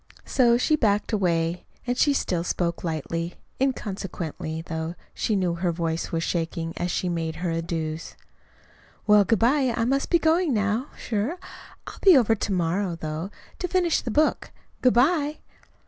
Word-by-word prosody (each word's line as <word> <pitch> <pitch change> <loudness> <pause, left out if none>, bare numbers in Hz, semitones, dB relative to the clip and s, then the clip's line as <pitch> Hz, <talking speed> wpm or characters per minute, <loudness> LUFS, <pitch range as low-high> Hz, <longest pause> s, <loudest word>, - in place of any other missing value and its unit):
So 240 -3 +4
she 305 +5 +3
backed 210 -6 +1
away, 170 -3 +1 0.2
and 245 0 0
she 285 - +3
still 180 -11 0
spoke 170 -1 -1
lightly, 165 +1 -3 0.3
inconsequently, 185 - -3
though 160 0 -4 0.2
she 215 - 0
knew 180 -3 +1
her 170 +1 0
voice 165 -1 -2
was 165 0 -1
shaking, 165 -1 -2
as 175 - -2
she 180 - -1
made 165 -2 -2
her 175 0 -2
adieus. 165 -1 -3 0.9
"Well, 210 -1 +6
good 225 +3 +2
bye, 260 +4 +3
I 230 - +1
must 275 +3 0
be 345 - +5
going 320 -3 +2
now, 210 +6 0
sure. 230 - -2 0.5
I'll - - -9
be 375 -6 +8
over 230 -3 +4
to 210 -1 -2
morrow, 180 +1 0
though, 160 +3 -4 0.3
to 360 - -1
finish 350 -2 +2
the - - -4
book. 300 +8 +1 0.3
Good 250 -2 +4
bye." 295 +3 +3
195 Hz, 165 wpm, -25 LUFS, 165-250 Hz, 0.9 s, be